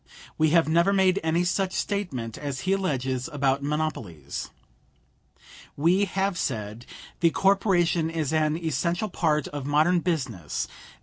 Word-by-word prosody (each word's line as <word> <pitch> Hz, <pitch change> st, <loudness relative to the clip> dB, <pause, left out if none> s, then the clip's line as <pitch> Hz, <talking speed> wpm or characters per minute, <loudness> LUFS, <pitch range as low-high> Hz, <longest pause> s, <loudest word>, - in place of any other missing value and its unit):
We 155 Hz, 0 st, +3 dB
have 165 Hz, 0 st, +4 dB
never 170 Hz, +4 st, +3 dB
made 190 Hz, -1 st, +3 dB
any 165 Hz, +2 st, +1 dB
such 185 Hz, +1 st, 0 dB
statement 135 Hz, -, -3 dB
as 140 Hz, -3 st, -5 dB
he 190 Hz, -, +1 dB
alleges 135 Hz, -8 st, -1 dB
about 140 Hz, -2 st, +1 dB
monopolies. 140 Hz, -, -3 dB, 1.3 s
We 175 Hz, +7 st, +3 dB
have 195 Hz, -1 st, -1 dB
said: 110 Hz, -1 st, -3 dB, 0.3 s
"The 170 Hz, -, +4 dB
corporation 180 Hz, -3 st, +2 dB
is 160 Hz, -3 st, -2 dB
an 155 Hz, 0 st, +2 dB
essential 170 Hz, +5 st, -1 dB
part 155 Hz, -5 st, 0 dB
of 145 Hz, -2 st, -5 dB
modern 155 Hz, +5 st, +3 dB
business. 130 Hz, -, -2 dB
160 Hz, 130 wpm, -26 LUFS, 135-180 Hz, 1.3 s, have